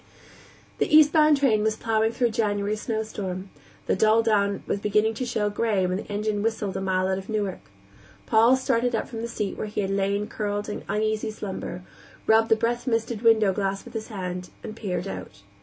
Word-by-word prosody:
The - - +2
eastbound 305 0 +6
train 245 -7 +3
was 220 0 +1
plowing 220 0 +1
through 240 0 +1
a - - -6
January 210 -2 0
snowstorm; 210 -4 -4 0.3
the - - +1
dull 220 +3 +4
dawn 200 -3 +1
was - - -1
beginning 210 +2 +2
to 250 +2 -4
show 210 -3 0
gray 205 -3 +1
when 180 0 0
the 205 - -7
engine 205 0 -1
whistled 215 -3 -2
a 190 - -2
mile 185 -1 +1
out 190 0 0
of 195 - -11
Newark. 205 -4 -2 0.7
Paul 230 - +5
started 245 -2 +1
up - - -2
from 225 -2 -6
the 235 - -3
seat 210 -3 -4
where - - -3
he 210 0 -2
had 195 -1 -2
lain 200 +1 0
curled 205 -1 -3
in 210 - -4
uneasy 215 0 0
slumber, 195 -3 -6 0.4
rubbed 225 +1 +4
the 225 - +6
breath 235 +3 -1
misted 230 -2 -1
window 220 -4 +4
glass 195 0 -2
with - - -12
his 220 -1 -4
hand, 180 -3 -5
and 215 -1 -7
peered 200 -5 -3
out. 95 +1 -8
215 Hz, 200 wpm, -25 LUFS, 200-225 Hz, 0.7 s, eastbound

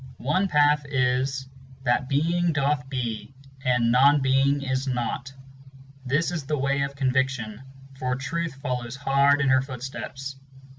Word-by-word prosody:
One 185 +9 +1
path 150 -2 +3
is: 130 0 0 0.4
That 130 +1 +1
Being 170 +4 +1
doth 140 -2 0
be, 125 -1 -4 0.3
and 125 -3 +2
Non 140 +4 +5
Being 135 +1 +2
is 130 0 -1
not: 125 +1 -2 0.8
This 155 +7 +1
is 170 -4 -3
the 150 0 0
way 140 +1 0
of 140 0 -2
Conviction, 130 -4 -1 0.4
for 125 -1 -1
Truth 150 +4 -3
follows 125 -3 -4
hard 140 +1 +3
in 140 - +2
her 130 0 +5
footsteps. 135 +1 -7
135 Hz, 140 wpm, -25 LUFS, 130-145 Hz, 0.8 s, Non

